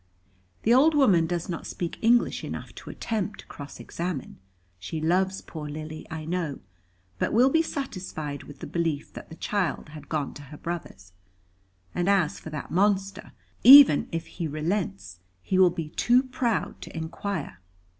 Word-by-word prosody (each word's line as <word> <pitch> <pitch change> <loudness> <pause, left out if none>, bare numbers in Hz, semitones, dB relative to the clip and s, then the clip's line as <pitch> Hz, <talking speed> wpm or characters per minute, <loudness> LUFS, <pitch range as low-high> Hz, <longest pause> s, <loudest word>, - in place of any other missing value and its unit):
The 230 - +4
old 300 +5 +5
woman 195 - +4
does 175 -1 -2
not 170 -2 -5
speak 170 -2 -5
English 235 +1 +3
enough - - -6
to - - -10
attempt 210 -2 -3
to - - -20
cross 145 0 -10
examine. 170 - -5 0.4
She 155 - -5
loves 185 +4 +1
poor 150 -2 -7
Lily, 155 +1 -7
I 160 -2 -6
know, 165 -4 -2 0.6
but - - 0
will 250 +5 +5
be 320 - +4
satisfied 185 - -5
with 145 - -13
the - - -5
belief 165 -4 -2
that - - -10
the 160 - -9
child 185 -6 -2
had 150 -2 -11
gone 150 -3 -2
to - - -10
her 150 - -10
brother's. 100 - -7 0.8
And 175 +2 0
as 190 -6 +2
for - - -9
that 150 -2 -6
monster, 195 +1 0 0.3
even 270 - +10
if 165 0 -3
he 170 -3 -5
relents, 150 - -3 0.2
he 185 - +1
will 185 -1 +7
be 165 -3 -5
too 245 +10 +3
proud 250 -4 -2
to - - -8
inquire." 160 - -4
170 Hz, 165 wpm, -26 LUFS, 155-200 Hz, 0.8 s, even